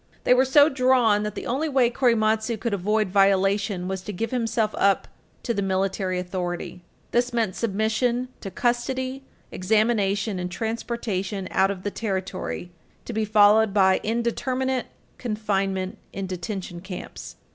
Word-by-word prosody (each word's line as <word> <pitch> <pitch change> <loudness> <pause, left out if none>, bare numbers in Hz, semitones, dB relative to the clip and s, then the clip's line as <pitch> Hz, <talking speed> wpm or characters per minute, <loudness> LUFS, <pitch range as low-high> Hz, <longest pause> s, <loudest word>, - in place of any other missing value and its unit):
They - - +5
were 255 +1 +4
so 285 +2 +6
drawn 255 -6 +3
that 210 -1 -4
the - - -5
only 290 +6 -1
way 260 -4 +3
Korematsu 225 -2 +2
could 230 -1 -2
avoid 210 +2 +1
violation 195 0 +2
was 190 0 -3
to 210 - -6
give 225 +5 -3
himself 225 -3 0
up 200 -2 +3 0.4
to 235 - -1
the 200 - -1
military 190 -1 -1
authority. 180 -1 -4 0.3
This 245 +1 +1
meant 225 -6 0
submission 230 +3 0
to 195 - -6
custody, 255 +4 -1 0.3
examination, 205 0 +1
and 180 0 -3
transportation 210 -2 -3
out 190 0 +3
of 190 -2 -5
the 205 - -2
territory, 190 -4 -4 0.3
to 235 - -5
be 220 0 0
followed 210 0 +5
by 190 -2 +4
indeterminate 255 +3 -1 0.3
confinement 195 -4 -2
in 195 0 -4
detention 180 -1 -5
camps. 185 -1 -8
210 Hz, 145 wpm, -24 LUFS, 190-235 Hz, 0.4 s, so